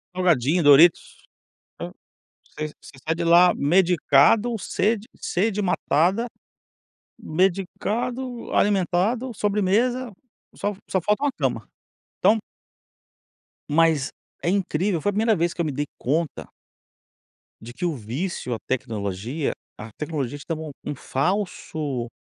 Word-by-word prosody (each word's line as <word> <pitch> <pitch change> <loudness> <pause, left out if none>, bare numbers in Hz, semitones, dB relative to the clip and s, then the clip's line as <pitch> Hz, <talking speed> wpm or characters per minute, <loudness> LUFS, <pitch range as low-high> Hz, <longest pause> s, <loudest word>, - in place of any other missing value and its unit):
Salgadinho, 170 -2 +2
doritos, 145 +4 +5 0.5
vo - - -6 0.6
você 155 0 -3
você - - -14
sai 160 +1 0
de 170 0 -3
lá 175 +2 +6
medicado, 175 - +4
sede 215 +2 -1
sede 210 +3 -1
matada, 190 +4 +1 0.9
medicado, 220 +8 -2
alimentado, 205 +6 +1
sobremesa, 215 +5 +1 0.4
só 205 0 -2 0.2
só 190 - +1
falta 210 - 0
uma 285 - +2
cama. - - -2 0.5
Então 220 - +4 1.3
Mas 155 -2 +3 0.3
é 170 - +1
incrível, 185 -2 0
foi 205 - +1
a - - -1
1º 220 +2 +2
vez 170 0 0
que - - -3
eu 170 - 0
me 150 - -1
dei 145 +2 -2
conta 155 +4 -2 1.1
de 120 +2 -10
que 135 - -4
o 170 - 0
vício 125 - -4
à 110 - -4
tecnologia, 115 - -3 0.2
a 110 +1 -9
tecnologia 145 0 -4
te - - -12
dá 165 - -1
um 155 -1 -6
um 145 - -4
falso 145 - -2
175 Hz, 125 wpm, -24 LUFS, 145-205 Hz, 1.3 s, lá